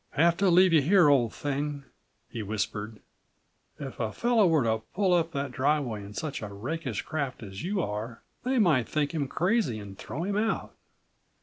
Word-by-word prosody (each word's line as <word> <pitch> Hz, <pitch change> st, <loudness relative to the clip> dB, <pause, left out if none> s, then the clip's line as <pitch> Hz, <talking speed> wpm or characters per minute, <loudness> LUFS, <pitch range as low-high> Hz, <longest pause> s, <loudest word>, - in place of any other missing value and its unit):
"Have 170 Hz, +3 st, +4 dB
to 195 Hz, -1 st, +3 dB
leave 180 Hz, 0 st, +6 dB
you 155 Hz, -, +6 dB
here, 175 Hz, +1 st, +5 dB
old 125 Hz, -6 st, +3 dB
thing," 145 Hz, +7 st, -3 dB, 0.4 s
he 115 Hz, -, -6 dB
whispered. 105 Hz, +1 st, -3 dB, 0.8 s
"If 135 Hz, -3 st, -7 dB
a 110 Hz, -2 st, -1 dB
fellow 235 Hz, -, +3 dB
were 160 Hz, -5 st, +3 dB
to 110 Hz, -1 st, +1 dB, 0.2 s
pull 190 Hz, -2 st, +3 dB
up 170 Hz, -1 st, +2 dB
that 140 Hz, -1 st, -2 dB
driveway 130 Hz, -4 st, 0 dB
in 100 Hz, +1 st, -10 dB
such 155 Hz, +3 st, -4 dB
a 105 Hz, -, -4 dB
rakish 125 Hz, +2 st, -4 dB
craft 140 Hz, -6 st, -4 dB
as 95 Hz, 0 st, -8 dB
you 190 Hz, 0 st, -1 dB
are, 110 Hz, +3 st, -5 dB, 0.2 s
they 260 Hz, +1 st, 0 dB
might 155 Hz, -, +3 dB
think 150 Hz, -2 st, 0 dB
him 145 Hz, -4 st, -1 dB
crazy 180 Hz, -, +1 dB
and 100 Hz, -2 st, -9 dB
throw 155 Hz, -, -5 dB
him 200 Hz, +2 st, -1 dB
out. 225 Hz, +1 st, -1 dB
145 Hz, 185 wpm, -28 LUFS, 110-175 Hz, 0.8 s, leave